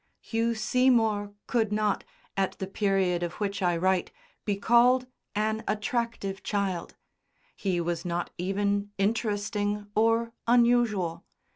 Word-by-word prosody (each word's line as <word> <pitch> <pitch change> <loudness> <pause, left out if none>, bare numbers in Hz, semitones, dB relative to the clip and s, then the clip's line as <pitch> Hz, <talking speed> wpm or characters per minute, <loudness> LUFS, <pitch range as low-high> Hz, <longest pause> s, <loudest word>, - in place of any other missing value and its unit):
Hugh 230 0 -1
Seymour 225 -3 +2
could 225 -3 +1
not, 210 -1 +1 0.3
at 195 -1 0
the 190 - -3
period 195 -3 +1
of 175 -1 -2
which 200 0 -3
I 175 -2 +2
write, 185 +1 +1 0.3
be 205 - +1
called 240 +5 +4 0.3
an 215 +1 0
attractive 210 -2 -2
child; 195 -4 -2 0.6
he 185 -3 -1
was 170 -1 -2
not 175 0 -2
even 200 +2 0
"interesting" 205 0 0
or 230 +2 +2
"unusual." 235 -8 +3
205 Hz, 120 wpm, -28 LUFS, 190-225 Hz, 0.6 s, called